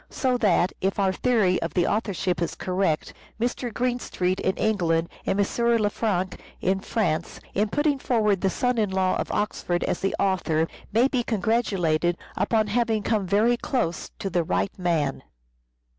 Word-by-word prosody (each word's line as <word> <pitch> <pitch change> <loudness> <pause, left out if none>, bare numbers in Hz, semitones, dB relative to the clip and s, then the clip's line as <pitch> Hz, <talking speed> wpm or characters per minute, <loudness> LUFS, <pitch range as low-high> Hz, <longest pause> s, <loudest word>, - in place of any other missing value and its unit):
So 260 -3 0
that, 190 -5 +3
if 195 +1 0
our 195 -2 +2
theory 210 -5 +2
of - - -4
the 175 -2 +3
authorship 195 -5 -1
is 170 - -1
correct, 185 -4 -1 0.3
Mr. 240 +1 -1
Greenstreet 240 -6 -1
in 190 - 0
England 170 -6 +1 0.2
and 195 - +1
M. 200 - +4 0.3
Lefranc 205 -3 -1 0.2
in 190 +1 +1
France, 180 -6 -1
in 210 +2 +1
putting 290 +2 +1
forward 210 -7 +1
the 195 - +2
son 250 +4 0
in 210 -2 +1
law 190 -1 +1
of - - -3
Oxford 175 -4 -1
as - - -1
the 195 - -1
author, 175 -5 +1 0.2
may 235 +5 +4
be 260 -2 0
congratulated 185 -7 +1 0.2
upon 220 -2 +2
having 220 0 0
come 210 -4 0
very 220 +6 +3
close 235 - -2
to 195 - -4
the 175 0 +1
right 95 - -1
man. 165 -7 0
195 Hz, 160 wpm, -25 LUFS, 180-225 Hz, 0.3 s, M